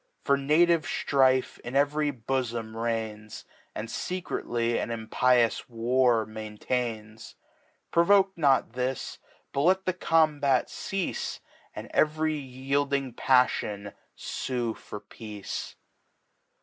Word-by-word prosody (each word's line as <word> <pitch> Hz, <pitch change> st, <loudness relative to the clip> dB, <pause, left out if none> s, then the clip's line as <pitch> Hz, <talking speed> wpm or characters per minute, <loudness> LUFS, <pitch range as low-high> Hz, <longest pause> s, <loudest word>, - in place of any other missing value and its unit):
For 140 Hz, -, +3 dB
native 155 Hz, +4 st, +3 dB
Strife 130 Hz, -2 st, +2 dB
in 120 Hz, +2 st, -7 dB
ev'ry 145 Hz, +1 st, +2 dB
Bofom 120 Hz, -3 st, -3 dB
reigns. 110 Hz, -2 st, -4 dB, 0.3 s
And 110 Hz, -, -4 dB
fecredy 120 Hz, -9 st, -2 dB
an -, -, -3 dB
impious 115 Hz, +2 st, +1 dB
War 120 Hz, 0 st, +2 dB
maintains: 110 Hz, 0 st, -4 dB, 0.6 s
Provoke 195 Hz, +3 st, +4 dB
not 140 Hz, -7 st, +2 dB
This, 125 Hz, +1 st, -3 dB, 0.3 s
but 140 Hz, -, 0 dB
let 190 Hz, +4 st, +3 dB
the 185 Hz, -, +1 dB
Combat 150 Hz, -6 st, +2 dB
ceafe. 195 Hz, -2 st, -3 dB, 0.4 s
And -, -, -7 dB
cv'ry 155 Hz, +1 st, +2 dB
yielding 135 Hz, 0 st, -1 dB
Paffion 105 Hz, -6 st, +1 dB, 0.2 s
fue 120 Hz, -3 st, -3 dB
for 105 Hz, -, -9 dB
Peace. 105 Hz, -2 st, -7 dB
130 Hz, 100 wpm, -27 LUFS, 115-145 Hz, 0.6 s, Provoke